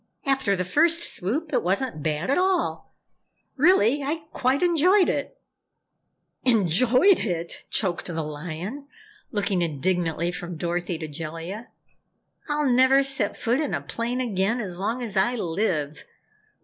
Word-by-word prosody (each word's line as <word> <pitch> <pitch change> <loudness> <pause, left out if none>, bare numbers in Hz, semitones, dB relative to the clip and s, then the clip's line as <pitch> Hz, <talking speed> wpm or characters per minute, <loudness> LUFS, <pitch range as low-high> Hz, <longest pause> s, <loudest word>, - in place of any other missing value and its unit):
"After 270 -7 +1
the 180 -1 -2
first 330 - +3
swoop, 290 - -1
it - - +3
wasn't 195 - -1
bad 155 - -1
at - - +2
all. 370 -1 0 0.6
Really, 290 - +4
I 310 +3 -3
quite 265 +4 +1
enjoyed 355 +3 +4
it!" - - -3 1.1
"Enjoyed 250 - +4
it!" 170 -5 -4
choked 185 -5 -1
the 165 -2 -3
Lion, 170 - -6 0.4
looking 195 -3 0
indignantly 170 +1 -1
from 175 -1 -6
Dorothy 175 +1 -2
to 155 - -6
Jellia. 165 - -6 0.8
"I'll 295 -1 +1
never 260 +2 +5
set 270 -6 -2
foot 240 +4 0
in 300 -3 -1
a - - -3
plane 235 +2 -3
again 220 0 0
as 185 -6 -5
long 230 +6 -2
as 215 -4 -4
I 200 +6 +2
live. 165 -7 -2
210 Hz, 135 wpm, -25 LUFS, 175-270 Hz, 1.1 s, never